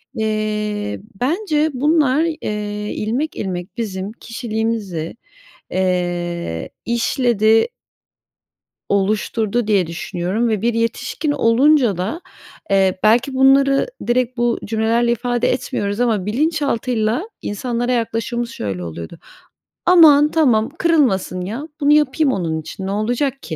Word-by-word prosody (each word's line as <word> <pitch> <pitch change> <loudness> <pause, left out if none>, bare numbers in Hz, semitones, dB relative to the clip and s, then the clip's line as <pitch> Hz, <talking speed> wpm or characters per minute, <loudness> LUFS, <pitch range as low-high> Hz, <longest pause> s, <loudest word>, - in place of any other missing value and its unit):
eee, 210 -1 -2 0.2
bence 310 +1 +1
bunlar, 295 +1 +2
eee, 210 -9 -3
ilmek, 245 +9 -2
ilmek 185 +1 -5
bizim 200 -3 -4
kişiliğimizi, 220 -8 -4 0.5
eee, 175 - -2
işledi 235 - +2 1.2
oluşturdu 215 +3 0
diye 200 -5 +2
düşünüyorum 180 +6 -2
ve 215 -3 -1
bir 235 0 +1
yetişkin 245 +6 -1
olunca 250 - +3
da, 195 - -3 0.5
eee, 190 -1 +3
belki 245 +6 +3
bunları 275 +1 +4 0.2
direkt 250 +1 +1
bu 240 0 +1
cümlelerle 225 +2 +1
ifade 245 0 0
etmiyoruz 205 -5 -2
ama 220 -6 +1
bilinçaltıyla 255 - 0
insanlara 240 +3 -2
yaklaşımımız 235 0 -2
şöyle 100 - -4
oluyordu: 85 - -8 0.7
"Aman, 305 -4 +7
tamam 240 -9 +3
kırılmasın 250 - +2
ya. 225 - -5
Bunu 290 0 +4
yapayım 295 -1 +3
onun 160 -5 -2
için. 190 +5 -7
Ne - - -2
olacak 245 +6 -1
ki?" 160 - -5
230 Hz, 110 wpm, -19 LUFS, 200-260 Hz, 1.2 s, Aman